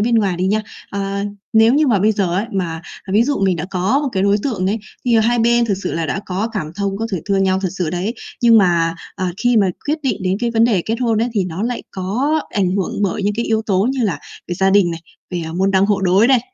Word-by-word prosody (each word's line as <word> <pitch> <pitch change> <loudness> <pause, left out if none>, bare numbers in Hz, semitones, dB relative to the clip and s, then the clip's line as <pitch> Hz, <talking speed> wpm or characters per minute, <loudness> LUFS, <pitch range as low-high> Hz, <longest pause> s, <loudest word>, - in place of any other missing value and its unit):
bên 230 +2 +2
ngoài 200 -5 +2
đi 180 +2 0
nha. 215 +3 +1 0.3
Ờ, 200 0 -3 0.3
nếu 225 +3 +5
như 300 +1 +3
mà 225 -7 +3
bây 215 +3 +3
giờ 190 -4 0
ấy, 205 +4 0
mà 170 -4 -3 0.3
ví 215 - +5
dụ 285 +3 0
mình 185 -2 +2
đã 165 - -3
có 195 +9 +1
một 285 - -1
cái 190 - 0
đối 200 +1 +3
tượng 210 -9 -1
ấy, 210 +4 0 0.3
thì 240 -2 +3
hai 240 +2 +2
bên 235 +1 +3
thực 210 - 0
sự - - -2
là 165 0 -1
đã 195 - -2
có 195 +4 -2
cảm 155 -8 -3
thông, 200 -1 -1
có 225 - -2
thể 185 - 0
thương 195 -1 +2
nhau 190 0 +1
thật 190 - -1
sự 170 -4 -1
đấy, 185 +7 -2 0.3
nhưng 230 -1 +7
mà, 170 -4 +2 0.2
à, 185 -2 -2
khi 245 +2 +2
mà 205 -3 +4 0.2
quyết 300 +2 0
định 255 -7 0
đến 185 +1 0
cái 240 -1 0
vấn 230 0 +3
đề 210 -7 +2
kết 225 - -2
hôn 230 -3 +1
ấy, 240 - 0
thì 200 -4 +1
nó 180 +2 -4
lại 240 +1 -2
có 245 +12 -1
ảnh 190 -3 +1
hưởng 195 +1 -2
bởi 200 +1 -1
những 205 +1 0
cái 235 - 0
yếu 220 0 0
tố 195 0 +2
như 265 -3 -1
là 175 -8 -1 0.3
về 175 - -2
gia 190 +2 +2
đình 195 -3 +4
này, 165 0 -5 0.3
về, 175 -2 -3
à, 160 - -6
môn 190 +3 +1
đăng 195 0 +3
hộ 205 -1 +1
đối 190 +4 +4
này. 260 -1 +4
200 Hz, 280 wpm, -18 LUFS, 185-230 Hz, 0.3 s, nhưng